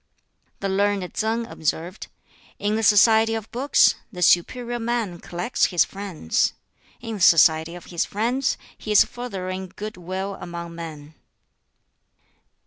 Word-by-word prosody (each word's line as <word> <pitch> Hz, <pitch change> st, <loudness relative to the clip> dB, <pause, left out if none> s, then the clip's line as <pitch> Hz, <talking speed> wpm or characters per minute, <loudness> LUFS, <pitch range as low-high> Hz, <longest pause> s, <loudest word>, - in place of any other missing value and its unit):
The 195 Hz, -, -1 dB
learned 195 Hz, -1 st, 0 dB
Tsang 225 Hz, +2 st, -1 dB
observed, 170 Hz, -1 st, -4 dB, 0.5 s
"In 210 Hz, +1 st, -1 dB
the 220 Hz, -, 0 dB
society 220 Hz, +1 st, +5 dB
of 220 Hz, -1 st, -6 dB
books 265 Hz, +4 st, +4 dB, 0.2 s
the 180 Hz, -4 st, -3 dB
'superior 240 Hz, +8 st, +2 dB
man' 225 Hz, -6 st, -2 dB
collects 175 Hz, +9 st, -1 dB
his 175 Hz, -3 st, +3 dB
friends; 195 Hz, -, -1 dB, 0.5 s
in 230 Hz, -1 st, -5 dB
the -, -, -9 dB
society 160 Hz, -1 st, +5 dB
of 175 Hz, -, -11 dB
his 170 Hz, -, +1 dB
friends 245 Hz, +6 st, -1 dB, 0.2 s
he 215 Hz, -, -6 dB
is 210 Hz, -, +7 dB
furthering 190 Hz, -6 st, -6 dB
good 215 Hz, 0 st, -6 dB
will 190 Hz, +2 st, -5 dB
among 170 Hz, -1 st, -7 dB
men." 160 Hz, -3 st, -9 dB
195 Hz, 135 wpm, -23 LUFS, 175-225 Hz, 0.5 s, is